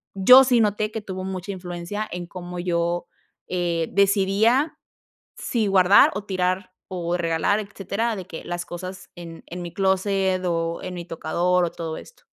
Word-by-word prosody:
yo 250 +8 +8
sí 245 -2 +3
noté 210 0 0
que 220 - -4
tuvo 190 -2 -6
mucha 190 0 -5
influencia 180 +3 -5
en 175 0 -5
cómo 180 0 -8
yo, 175 0 -1 0.4
eh, 170 -2 -1
decidía 200 - +3 0.6
si 225 -3 -1
guardar, 190 0 +6
o 205 +1 -4
tirar, 185 -1 -1 0.2
o 175 -1 -2
regalar, 170 +4 +1
etcétera, 205 +3 -3
de 185 -3 -7
que 165 - -8
las 175 0 -4
cosas 185 +2 -8
en 165 -1 -10
en 175 +1 -7
mi 170 -1 -7
clóset 190 -1 +1
o 165 -1 -1
en 185 -1 -5
mi 175 - -6
tocador 175 +2 0
o 170 - -1
todo 160 -1 -5
esto. - - -13
185 Hz, 165 wpm, -23 LUFS, 175-200 Hz, 0.6 s, yo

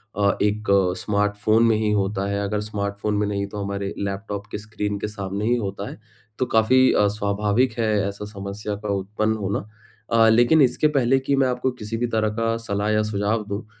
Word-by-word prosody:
अ, 100 -1 +2
एक 105 +1 0 0.3
स्मार्टफ़ोन 105 +2 +1
में 115 -1 +4
ही 110 -1 0
होता 100 -1 0
है, 100 0 -1
अगर 105 +1 -1
स्मार्टफ़ोन 105 0 -3
में 105 - +1
नहीं 100 -1 -1
तो 105 - -5
हमारे 100 0 -3
लैपटॉप 100 +1 -4
के - - -3
स्क्रीन 105 -1 -4
के - - -2
सामने 100 -1 -4
ही 120 +2 +3
होता 100 -2 -4
है। - - -9 0.4
तो 130 - +2
काफ़ी 125 +3 +4
अ, 105 - +4
स्वाभाविक 105 +4 0
है 115 - +2 0.2
ऐसा 100 +1 -6
समस्या 100 +1 -5
का 105 - -3
उत्पन्न 105 +3 -1
होना। 100 -1 -2 0.5
अ, 115 -1 +5
लेकिन 120 +7 +5
इसके 130 +3 +3
पहले 135 +1 +3
की 140 +1 0
मैं 135 -1 +3
आपको 125 +1 0
किसी 115 -2 -5
भी 120 +1 0
तरह 110 -1 +2
का 115 0 +1
सलाह 100 0 -1
या 110 0 +2
सुझाव 105 +2 0
दूँ, 100 +1 -4
105 Hz, 200 wpm, -23 LUFS, 100-115 Hz, 0.5 s, अ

